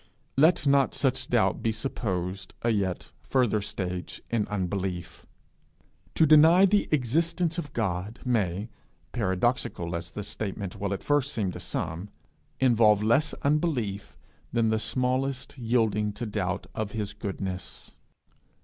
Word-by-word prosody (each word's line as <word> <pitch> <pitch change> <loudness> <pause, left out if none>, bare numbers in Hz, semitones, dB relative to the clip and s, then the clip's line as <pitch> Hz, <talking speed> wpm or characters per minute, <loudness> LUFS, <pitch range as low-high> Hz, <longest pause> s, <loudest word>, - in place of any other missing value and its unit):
Let 160 +4 +4
not 140 -3 +3
such - - 0
doubt - - +2
be 115 - +1
supposed 95 -5 -3
a 120 - +3
yet 95 -4 -1
further 120 -5 +1
stage 90 -3 -4
in 115 -3 +1
unbelief. 95 -3 -3 0.9
To 160 - +5
deny 160 +5 +7
the 200 +1 +2
existence 165 +5 +1
of 145 -4 -6
God 100 0 -2
may, 105 -4 0 0.4
paradoxical 95 -4 0
as 85 0 -4
the 105 - -6
statement 100 -1 -5
will 100 0 -2
at 100 - -3
first 145 -1 +2
seem 100 -5 -1
to - - -8
some, 85 +6 -3 0.5
involve 110 -5 +4
less 145 +8 +2
unbelief 140 - 0 0.3
than 115 -2 +2
the 110 0 +1
smallest 130 +3 -1
yielding 110 -3 +1
to 120 - -5
doubt 95 -4 -2
of 110 -2 -3
his 105 -2 -3
goodness. 95 -3 -6
110 Hz, 130 wpm, -27 LUFS, 95-130 Hz, 0.9 s, deny